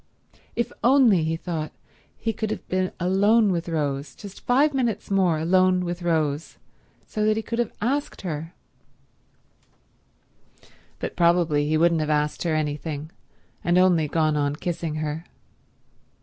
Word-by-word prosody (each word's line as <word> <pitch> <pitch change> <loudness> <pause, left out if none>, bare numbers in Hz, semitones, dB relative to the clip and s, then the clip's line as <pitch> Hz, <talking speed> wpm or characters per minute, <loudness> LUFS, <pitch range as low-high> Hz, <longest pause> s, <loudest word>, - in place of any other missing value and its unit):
If 235 0 -1
only, 240 - +5
he 160 +1 0
thought, 160 -2 -4 0.5
he 225 -1 -2
could 220 0 -3
have 215 - -5
been 185 0 0
alone 200 +4 +3
with 170 -1 -2
Rose; 140 -3 -2
just 200 -2 -11
five 280 +4 +4
minutes 240 -7 -1
more 185 -5 +3
alone 185 +2 +3
with 175 +1 -4
Rose, 160 -3 -1 0.5
so 215 - -3
that 215 0 +2
he 220 - -2
could 230 +1 -4
have 240 - 0
asked 275 +6 -1
her— 165 -1 -5 2.4
But - - -5
probably 170 -4 +3
he 155 +1 +2
wouldn't 165 0 +3
have 155 - -2
asked 150 0 0
her 165 -3 0
anything, 150 0 -3 0.5
and 175 +1 +2
only 180 -4 +4
gone 155 0 +1
on 145 -1 0
kissing 165 -1 -3
her. 155 +2 -4
170 Hz, 145 wpm, -24 LUFS, 155-200 Hz, 2.4 s, only